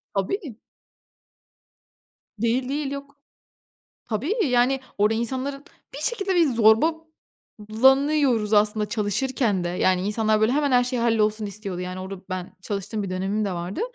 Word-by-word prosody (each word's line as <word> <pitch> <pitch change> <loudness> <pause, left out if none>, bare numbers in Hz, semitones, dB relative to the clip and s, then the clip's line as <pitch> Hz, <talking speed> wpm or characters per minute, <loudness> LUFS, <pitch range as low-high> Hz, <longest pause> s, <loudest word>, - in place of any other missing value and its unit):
Tabii. 195 - 0 2.0
Değil, 250 +3 0
değil 285 -1 -2
yok 280 0 -7 0.9
Tabii, 240 - -1
yani 250 +1 +2 0.2
orada 210 +2 +3
insanların 265 +4 -3 0.3
bir - - -6
şekilde, 395 -2 0
bir 340 -3 +4 1.2
zorbalanıyoruz 265 -1 +3
aslında 210 0 +3
çalışırken 210 -2 0
de, - - -1
yani 180 +1 +1
insanlar 215 0 +1
böyle 220 +3 +3
hemen 285 -2 +1
her 245 0 +5
şey 250 0 -2
hallolsun 215 -2 +1
istiyordu 200 -3 -5
yani, 185 +1 -5
orada 190 0 -7
ben 185 -1 -5
çalıştığım 205 +1 -4
bir 190 - -5
dönemim 195 +3 -1
de 195 - -2
vardı. 175 +2 -4
220 Hz, 135 wpm, -24 LUFS, 200-265 Hz, 2.0 s, her